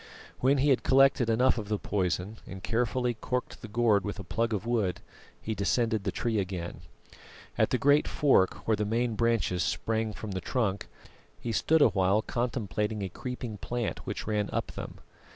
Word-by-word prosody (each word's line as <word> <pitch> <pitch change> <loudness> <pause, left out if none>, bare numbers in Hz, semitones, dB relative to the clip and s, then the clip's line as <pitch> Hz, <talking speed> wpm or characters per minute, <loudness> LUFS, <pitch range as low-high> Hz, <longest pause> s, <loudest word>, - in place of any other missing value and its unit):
When 135 +3 +3
he 140 +2 +3
had 130 - +4
collected 135 -2 +4
enough 125 +2 +3
of 105 -1 -7
the 105 - +1
poison 95 +1 -2
and 95 -1 -8
carefully 120 +1 0
corked 125 +3 -4
the 115 - -7
gourd 105 -2 +2
with 105 - -4
a 100 - -6
plug 115 +6 -1
of 105 -1 -2
wood, 110 -7 0 0.4
he 110 - -3
descended 110 +1 0
the 95 - 0
tree 115 +1 -1
again. 90 -3 -4 0.7
At - - +2
the - - +1
great 145 +3 +4
fork 135 -10 +2
where 110 - +4
the 105 - -1
main 115 +3 0
branches 115 -5 +1
sprang 110 +7 -1
from 105 -1 -6
the 95 -1 -3
trunk, 105 -6 -1 0.5
he 120 - -3
stood 155 +7 +3
a - - +6
while 95 +2 +2
contemplating 110 -3 -2
a 95 - -3
creeping 125 0 -6
plant 120 +1 -3
which - - -4
ran 105 -1 -1
up - - -2
them. - - -7
110 Hz, 185 wpm, -29 LUFS, 100-120 Hz, 0.7 s, a